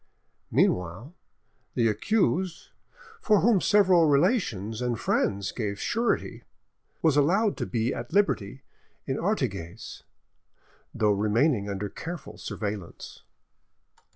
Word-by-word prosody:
Meanwhile, 90 - 0 0.6
the 115 -2 +3
accused, 180 - 0 0.5
for 210 -2 +3
whom 215 -4 +4
several 185 -5 +4
relations 140 - +1
and 120 -2 -1
friends 100 -2 0
gave 105 -4 -4
surety, 235 +2 -1 0.6
was 160 -3 +4
allowed 190 +9 +3
to - - -3
be 115 0 -1
at 120 0 -6
liberty 135 - 0 0.4
at 135 0 -2
Artigues, 110 - -3 0.9
though 105 -2 +1
remaining 105 +2 +1
under 100 +1 -3
careful 165 - -8
surveillance. 100 -5 -6
125 Hz, 100 wpm, -27 LUFS, -, 0.9 s, whom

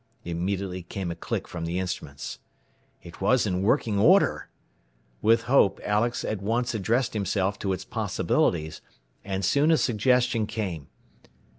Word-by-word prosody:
Immediately 90 +2 -3
came 90 0 -5
a - - -5
click 85 - -4
from 85 -1 -5
the 85 +2 -2
instruments. 70 -9 -5 0.6
It 85 +1 -12
was 120 +6 +3
in 90 -3 -1
working 110 -1 +1
order! 185 - +4 0.7
With 115 +1 +4
hope 120 -7 +3
Alex 110 +3 0
at 105 -3 -3
once 115 +4 0
addressed 115 +4 0
himself 100 -1 -1
to 95 - -1
its 95 - -3
possibilities, 80 -2 -1 0.4
and 95 -1 -2
soon 145 - +3
a 160 - +5
suggestion 125 -1 +2
came. 90 -11 -4
100 Hz, 140 wpm, -26 LUFS, 90-115 Hz, 0.7 s, a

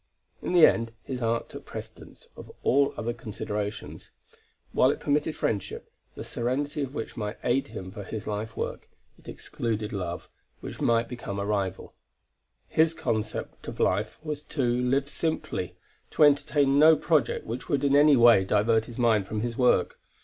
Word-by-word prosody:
In - - -3
the 175 -3 +8
end, 115 0 +1
his 130 -2 -5
art 115 0 0
took - - -9
precedence - - -10
of - - -11
all 140 +1 +3
other 120 +1 -2
considerations; 105 -3 -5 0.6
while 130 - +4
it - - -1
permitted 150 +1 0
friendship, 100 -2 -3 0.2
the - - -6
serenity 140 +5 -2
of 140 0 -4
which 115 - -5
might 105 0 -4
aid 135 +3 +1
him 95 -5 -8
in 105 -3 -7
his 110 0 -6
life 105 +2 -4
work, - - -4 0.3
it - - -21
excluded 110 -2 -4
love, 90 -3 -4 0.3
which - - -8
might 115 0 +2
become 115 -5 -6
a 100 - -2
rival. 100 -2 -2 0.7
His 160 +1 +2
concept 110 -6 -3
of - - -7
life - - 0
was 150 -2 -4
to 145 -2 -2
live 125 +3 +1
simply, 150 - -3 0.3
to - - +2
entertain 145 -1 +4
no 160 +1 +8
project 155 -1 +1
which 120 +3 -6
would 140 -1 +1
in 140 0 +3
any 145 -1 +6
way 115 -4 +7
divert 110 +3 +2
his 120 - -10
mind 110 -5 +2
from 105 0 -3
his 120 0 -3
work. 125 0 +2
120 Hz, 170 wpm, -27 LUFS, 105-140 Hz, 0.7 s, the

